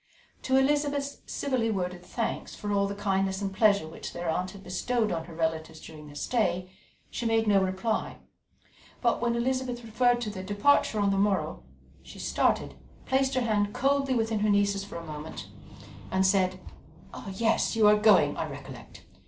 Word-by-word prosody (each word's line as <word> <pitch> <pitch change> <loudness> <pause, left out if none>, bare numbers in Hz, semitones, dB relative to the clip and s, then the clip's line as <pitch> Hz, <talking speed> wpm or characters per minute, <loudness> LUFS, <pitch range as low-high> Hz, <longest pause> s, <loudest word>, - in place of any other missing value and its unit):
To 265 0 +2
Elizabeth's 285 0 +1
civilly 255 -5 -1
worded 180 -3 -3
thanks 230 +5 -4
for 205 - -4
all 200 -1 +2
the 200 - -4
kindness 195 -1 0
and 195 -1 -3
pleasure 200 -4 +3
which 160 - -8
their 175 0 -5
aunt 180 +3 -1
had 195 0 -12
bestowed 220 +4 -1
on 165 -2 -2
her 165 - -11
relatives 160 -1 -2
during 155 -1 -11
their 145 - -12
stay, 185 -2 -1 0.4
she 235 - -2
made 225 0 +2
no 200 -2 +5
reply; 190 +4 -1 0.8
but 235 -2 +1
when 235 -1 +1
Elizabeth 250 0 -1
referred 240 +2 +2
to 215 -3 -3
their 190 -2 -6
departure 205 +4 +2
on 200 -1 +2
the 195 - +1
morrow, 195 - 0 0.4
she - - -13
started, - - 0 0.3
placed 265 0 +1
her 255 - +2
hand 210 -3 0
coldly 275 0 +1
within 225 -2 0
her 210 +1 +1
niece's 200 -1 +2
for 200 - -10
a 170 0 -6
moment, 155 0 -7 0.6
and 190 0 +2
said: 185 -1 +2 0.7
"Yes, 225 +4 +1
you 220 -2 +5
are 210 - +7
going, 210 0 +5
I - - -3
recollect. - - -10
205 Hz, 175 wpm, -28 LUFS, 185-235 Hz, 0.8 s, are